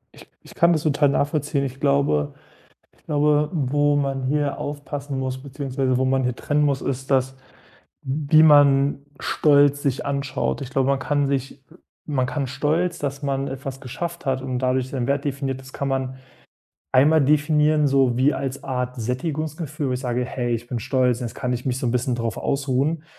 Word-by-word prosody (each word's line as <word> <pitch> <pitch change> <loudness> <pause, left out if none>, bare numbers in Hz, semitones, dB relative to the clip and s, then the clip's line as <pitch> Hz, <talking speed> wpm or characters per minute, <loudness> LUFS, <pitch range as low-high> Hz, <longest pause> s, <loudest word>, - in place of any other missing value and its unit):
Ich - - -16
ich - - -15
kann 170 0 +4
das 155 - -1
total 145 -2 +3
nachvollziehen. 145 0 0
Ich 135 0 -6
glaube 140 - +1 0.7
ich - - -31
glaube, 150 0 +2
wo 145 -1 +1
man 135 -2 -1
hier 140 0 0
aufpassen 145 -1 -5
muss, 130 0 -3
beziehungsweise 135 -2 -2
wo 130 - +1
man 130 0 +1
hier 125 -1 0
trennen 150 +2 0
muss, 140 -2 +1
ist 135 0 -4
das, 130 0 +1 0.7
wie 150 +3 +3
man 140 -2 +5 0.2
Stolz 145 -1 +3
sich 135 -2 -1
anschaut. 140 -1 -2
Ich 130 - -5
glaube, 135 0 +1
man 140 -1 +2
kann 145 +1 0
sich 135 -1 -2 0.2
äh, - - -16 0.3
man 130 -3 +1
kann 135 +1 -2
Stolz, 160 +7 -1
dass 140 0 -4
man 135 0 -1
etwas 135 0 -6
geschafft 170 +7 -6
hat 130 -1 0
und 130 -1 -3
dadurch 130 0 0
seinen 130 -2 -3
Wert 140 +2 0
definiert 135 -2 -3
ist 130 0 -14
kann 140 - -3
man, 130 -1 -2 0.8
einmal 145 +3 +5
definieren, 150 +1 +3
so 135 -3 +3
wie 140 +3 +3
als 140 +1 -4
Art 125 -1 -3
Sättigungsgefühl, 150 +4 -3
wo - - 0
ich 125 - -2
sage: 125 0 -1
„Hey, 120 -1 -2
ich 115 +1 -5
bin 120 -3 -3
stolz, 130 -1 +1
jetzt 120 -2 -5
kann 125 -2 -2
ich 125 0 -3
mich 130 0 0
so 125 - -2
'n - - +1
bisschen 125 0 0
darauf 115 -3 -3
ausruhen." 140 +3 -1
135 Hz, 190 wpm, -23 LUFS, 130-145 Hz, 0.8 s, man